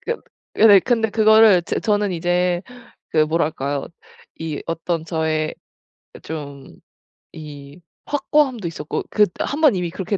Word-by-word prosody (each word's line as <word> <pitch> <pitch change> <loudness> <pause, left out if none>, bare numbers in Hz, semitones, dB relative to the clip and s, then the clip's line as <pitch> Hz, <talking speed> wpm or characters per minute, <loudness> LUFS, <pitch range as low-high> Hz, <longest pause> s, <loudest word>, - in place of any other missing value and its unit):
그 470 - -3 0.4
예 225 - +7
네. 200 -3 +8
근데 225 -3 0
그거를 220 -4 +5
제 - - -3
저는 205 -2 0
이제 175 +1 0 0.5
그 160 - 0
뭐랄까요? 150 -3 -2 0.5
이 155 -3 -4
어떤 165 0 -3
저의 160 -1 -2 0.7
좀 140 -3 -7 0.7
이 145 0 -11 0.3
확고함도 275 - 0
있었고 155 -2 -5
그 210 - +4
1 290 +3 -3
번 300 -6 +5
이미 180 -2 -2
그렇게 190 +3 -3
175 Hz, 230 characters per minute, -20 LUFS, 155-215 Hz, 0.7 s, 네